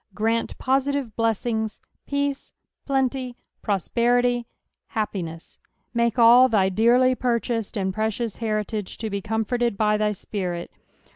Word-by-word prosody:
Grant 225 +2 0
positive 270 -3 0
blessing 225 0 0 0.4
peace, 280 -1 -2 0.3
plenty, 265 -2 -1 0.2
prosperity, 240 +4 +1 0.4
happiness; 185 -8 -5 0.3
make 235 0 +1
all 240 +2 +7
thy 195 -4 +3
dearly 240 +6 +4
purchased 235 -3 -1
and 190 -1 -1
precious 220 +1 -2
heritage 215 -2 -3
to 220 -1 -4
be 200 0 -2
comforted 225 +1 -1
Xthy 210 0 +2
Spirit. 180 -3 -4
230 Hz, 110 wpm, -24 LUFS, 210-245 Hz, 0.4 s, all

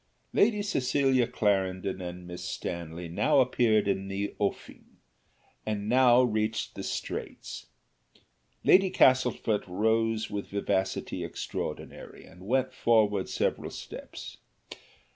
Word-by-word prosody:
Lady 210 -1 +3
Cecilia 135 - +2
Clarendon 95 -2 0
and 90 0 -7
Miss 90 0 -7
Stanley 85 0 -5
now 140 - +2
appeared 115 -5 +3
in 95 0 -1
the 100 +1 -3
offing, 100 - -4 0.7
and 105 -1 -3
now 125 +1 +5
reached 110 -2 -1
the - - -7
straits: - - -5 1.0
Lady 190 0 +6
Castlefort 125 - +3
rose 110 +3 +1
with 100 -1 -5
vivacity 95 -1 -2
extraordinary, - - -6
and 90 +2 -14
went 130 +2 +1
forward 105 -6 +2
several - - -1
steps. - - -9
110 Hz, 105 wpm, -28 LUFS, 95-125 Hz, 1.0 s, Lady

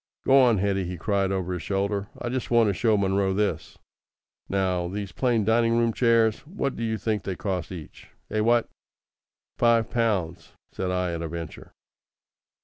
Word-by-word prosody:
"Go 135 - +5
on, 120 -4 +4
Hetty," 95 -1 0
he 90 0 -5
cried 100 +1 0
over 95 -1 -2
his 90 - -4
shoulder. 100 +2 -1
"I 120 - -3
just 130 -1 -3
want 115 -2 +4
to - - +1
show 110 +2 +2
Munro 95 -1 +1
this. 105 0 -2 0.7
Now, 90 -2 0
these 100 +1 -5
plain 120 -5 +1
dining 115 +1 +3
room 115 -1 +2
chairs, 115 -2 +3
what 150 -6 -3
d'you 110 -1 -2
think 110 -2 -1
they 95 -1 -4
cost 90 -4 -3
each? 85 -5 -10 0.2
Eh, 110 - 0
what?" 115 +2 +3 0.9
"Five 115 -1 +3
pounds," 90 -9 -1 0.2
said 95 - -3
I 90 -1 -1
at 85 - -4
a 85 - -3
venture. 85 -1 -8
100 Hz, 170 wpm, -25 LUFS, 90-115 Hz, 0.9 s, Go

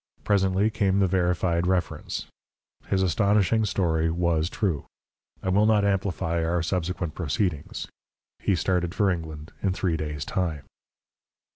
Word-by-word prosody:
Presently 100 +1 +2
came 100 -2 +1
the 100 - +4
verified 90 -1 +1
reference. 90 -3 -1 0.6
His 95 -1 +1
astonishing 105 +3 +3
story 80 -5 +1
was 85 -1 +1
true. 95 -10 -1 0.6
I 95 - 0
will 100 +3 +4
not 105 -2 +4
amplify 95 -4 0
our 85 0 0
subsequent 90 -2 -2
proceedings. 85 -1 -2 0.5
He 100 - +1
started 90 +1 0
for 100 -3 +3
England 80 -3 -5
in 95 -2 +1
three 90 -3 0
days' 75 -2 -4
time. 85 -7 -2
90 Hz, 130 wpm, -26 LUFS, 85-100 Hz, 0.6 s, the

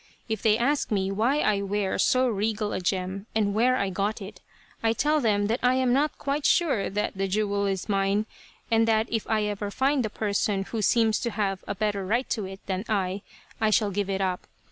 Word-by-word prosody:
If 220 -2 -3
they 215 -1 +4
ask 275 +5 +1
me 195 -2 0
why 240 +9 +1
I 205 -2 +2
wear 200 0 -1
so 255 0 +3
regal 215 -1 -1
a - - -1
gem, 190 +2 -2
and 205 -2 +1
where 245 +4 +3
I 200 -6 -1
got 205 +4 -1
it, 200 0 -10 0.4
I 225 0 +2
tell 300 +5 +1
them 205 -4 +2
that 225 +4 0
I 250 +1 +3
am 260 -1 +2
not 290 +3 +1
quite 280 +1 -2
sure 290 - +2
that 205 +1 -2
the 195 0 -1
jewel 200 0 0
is 190 -2 -2
mine, 200 +1 +1 0.5
and 225 0 +4
that 220 -1 +3
if 225 -2 -2
I 220 -1 +2
ever 205 0 -3
find 265 +4 +1
the 215 - -2
person 205 -2 -1
who 220 +2 -4
seems 220 +1 +3
to 235 - -2
have 200 -3 -2
a 205 - -3
better 205 -1 -1
right 235 +7 0
to 215 -4 -1
it 190 +1 -9
than 190 0 -2
I, 195 -2 -1 0.4
I 220 - +3
shall 210 0 +2
give 200 0 -2
it 195 0 -1
up. 185 -1 -2
210 Hz, 220 wpm, -26 LUFS, 195-230 Hz, 0.5 s, they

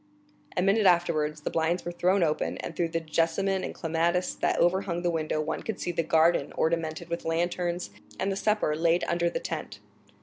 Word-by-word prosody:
A 180 - +3
minute 200 +1 +4
afterwards 155 -4 +2
the - - -3
blinds 165 +2 0
were 175 - -2
thrown 180 +2 +2
open, 155 -2 0
and 165 - -6
through 170 - +1
the 165 0 -2
jessamine 165 +4 0
and - - -3
clematis 170 +2 0
that - - 0
overhung 175 0 +1
the 175 - +2
window 155 -1 -1
one 155 +1 -2
could 220 - -4
see 175 - -2
the 170 - 0
garden 165 +1 +3
ornamented 160 0 -1
with 170 0 -4
lanterns, 175 +1 -1 0.3
and 195 - 0
the - - -1
supper 210 -6 +1
laid 165 +2 +2
under 170 0 +1
the - - -3
tent. - - -5
170 Hz, 195 wpm, -28 LUFS, 165-180 Hz, 0.3 s, minute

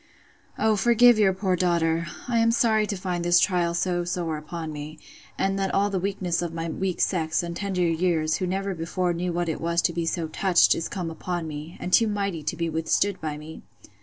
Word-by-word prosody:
O 220 0 +2
forgive 235 +2 +5
your 200 -3 +5
poor 190 -1 0
daughter!—I 170 +5 0
am 230 0 +4
sorry 220 -2 +2
to 200 - -3
find 180 -2 -3
this 175 0 +5
trial 175 -2 +1
so 175 0 0
sore 175 -2 -2
upon 155 +1 -6
me; 150 +1 -7 0.4
and 195 0 0
that 195 -1 0
all 200 +1 +2
the 190 - 0
weakness 185 -2 -1
of 170 -1 -4
my 165 0 -3
weak 185 +2 -3
sex, 160 -3 +1
and 170 0 -5
tender 190 -1 -1
years, 165 -2 +1
who 185 - -2
never 195 +2 -2
before 175 +1 -1
knew 175 +1 -2
what 175 0 -1
it 160 - -3
was 170 0 0
to 170 - +1
be 170 0 -2
so 165 -1 -1
touched, 180 +3 +4
is 165 - -3
come 175 -4 -4
upon 175 0 -4
me, 155 +2 -7
and 180 - -5
too 225 - +6
mighty 200 -5 -2
to 150 +3 -3
be 170 0 -2
withstood 165 +5 0
by 155 -2 -3
me. 155 +1 -10
175 Hz, 215 wpm, -25 LUFS, 165-195 Hz, 0.4 s, too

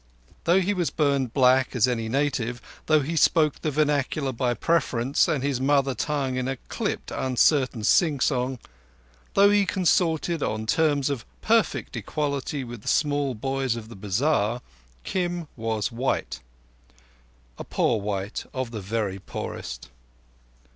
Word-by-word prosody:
Though 175 +3 +4
he 195 +3 +1
was 180 -4 0
burned 140 -5 +1
black 130 +1 +3
as 125 0 +4
any 115 -3 -1
native; 125 -2 -1 0.3
though 155 -1 +4
he 155 +5 -3
spoke 155 -1 +3
the 155 - 0
vernacular 145 -1 0
by 120 0 -1
preference, 140 -4 +1
and 150 -6 0
his 140 -3 -1
mother 135 0 +2
tongue 135 0 -2
in 130 0 -1
a 135 - -1
clipped - - -3
uncertain 130 -2 +2
sing 150 +5 +3
song; 130 -1 0 0.8
though 200 +1 +6
he 205 0 +4
consorted 170 -3 +1
on 110 0 -2
terms 145 +1 +2
of 135 -5 -3 0.2
perfect - - +1
equality 140 -2 -2
with 120 -3 -8
the - - -14
small 145 -3 +1
boys 135 +1 -1
of 110 -1 -8
the 115 - -10
bazar; 110 +3 0 0.4
Kim 175 - -2
was 110 -2 -2
white—a - - -7
poor 110 -3 +1
white 100 0 -3
of 130 -3 -3
the 110 -3 -5
very 100 -1 -2
poorest. - - -7
130 Hz, 140 wpm, -25 LUFS, 115-150 Hz, 0.8 s, though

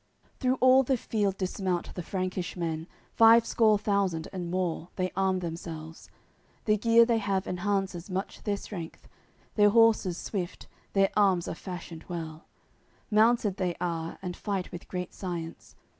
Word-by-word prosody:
AOI. - - -42 0.3
CCXVI - - -36
Through 255 0 +2
all 255 +1 +7
the 265 0 +1
field 205 -4 -1
dismount 185 -1 -2
the 180 - -5
Frankish 185 0 -3
men, 165 -1 -3 0.3
Five 230 0 +7
score 220 -3 +4
thousand 200 -6 0
and 180 -2 -4
more, 180 -2 -2
they 185 -1 -1
arm 190 -1 +1
themselves; 165 -1 -7 0.6
The 215 - +4
gear 230 +2 +5
they 230 -1 +2
have 195 -2 -1
enhances 190 -1 -2
much 190 +1 -4
their 205 -2 -1
strength, 175 -6 -8 0.5
Their 205 -1 +5
horses 220 -5 +4
swift, 185 -4 -4 0.3
their 195 -1 +3
arms 190 -4 +3
are - - -3
fashioned 175 -3 -8
well; 165 -2 -6 0.6
Mounted 215 -2 +3
they 180 -2 -1
are, 170 -2 -3
and 180 -1 -4
fight 195 -3 -3
with 175 -1 -9
great 180 -1 -5
science. 170 -3 -6
185 Hz, 160 wpm, -28 LUFS, 175-210 Hz, 0.6 s, all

